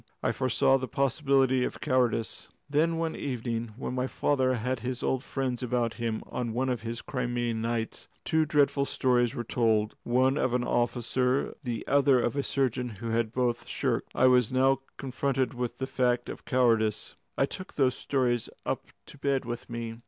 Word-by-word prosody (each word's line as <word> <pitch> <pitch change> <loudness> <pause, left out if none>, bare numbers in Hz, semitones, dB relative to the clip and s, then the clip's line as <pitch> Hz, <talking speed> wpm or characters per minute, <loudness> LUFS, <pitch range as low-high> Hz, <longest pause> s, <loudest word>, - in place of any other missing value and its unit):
I - - +2
foresaw 135 +1 +2
the 130 - -4
possibility 135 0 +2
of - - -3
cowardice. 125 -3 0 0.2
Then 160 +3 +2
one 165 -1 -1
evening, 115 -4 -3
when 125 - -4
my 130 0 -1
father 130 -2 +1
had 125 +2 -2
his 125 +1 -4
old 130 -1 0
friends 130 -3 -2
about 120 -2 0
him 115 -2 -2
on 120 -3 -3
one 130 +3 0
of 125 -3 -1
his 115 +1 -5
Crimean 120 -3 -2
nights, 115 0 -3 0.2
two 160 0 +3
dreadful 145 -2 +2
stories 125 -2 +1
were 120 - -2
told 110 -2 +1
one 130 +3 +2
of 125 -1 +1
an 125 - +1
officer, 120 +2 +1
the 120 -3 -3
other 140 -2 +4
of 120 +2 0
a 140 - +1
surgeon, 130 -3 0
who 115 +1 -6
had 115 -1 0
both 120 -1 -1
shirked. - - -1
I 130 - +4
was 125 -2 +5
now 135 +1 +3 0.2
confronted 135 -1 -1
with 125 -1 -3
the 130 - -2
fact 125 -2 0
of - - -8
cowardice. 115 -4 +2 0.2
I - - +4
took 185 +6 -8
those 130 -3 +3
stories 125 -4 0 0.2
up - - -2 0.2
to 145 - -14
bed 140 -1 0
with 120 0 -5
me. 115 -1 -5
125 Hz, 180 wpm, -28 LUFS, 120-135 Hz, 0.2 s, was